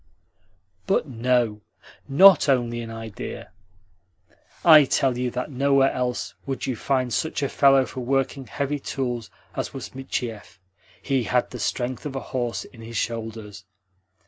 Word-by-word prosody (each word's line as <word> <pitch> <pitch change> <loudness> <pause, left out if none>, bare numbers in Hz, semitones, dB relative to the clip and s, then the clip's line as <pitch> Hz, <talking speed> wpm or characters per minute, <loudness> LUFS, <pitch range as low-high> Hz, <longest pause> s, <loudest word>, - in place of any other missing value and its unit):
"But - - +1
no 120 -3 0 0.5
NOT 155 +1 +7
only 120 -3 +1
in 115 - -7
idea. 115 -2 -7 1.1
I 155 -3 +9
tell 130 -1 +1
you 125 0 -1
that 125 +4 -4
nowhere 135 +1 +3
else 125 -1 -2
would 135 -1 -3
you 130 - -2
find 130 0 -1
such 160 +4 -1
a - - +2
fellow 135 -2 +5
for 130 - -8
working 135 +1 -1
heavy 140 +4 -2
tools 125 -4 -3 0.3
as - - -4
was - - -7
Michiev. 120 -7 -5 0.5
He 135 -4 0
had 125 +1 0
the 125 - -7
strength 125 +5 -2
of 135 - -7
a - - -1
horse 120 -6 -2
in 115 - -15
his 115 0 -6
shoulders." 110 -3 -4
125 Hz, 145 wpm, -24 LUFS, 115-135 Hz, 1.1 s, I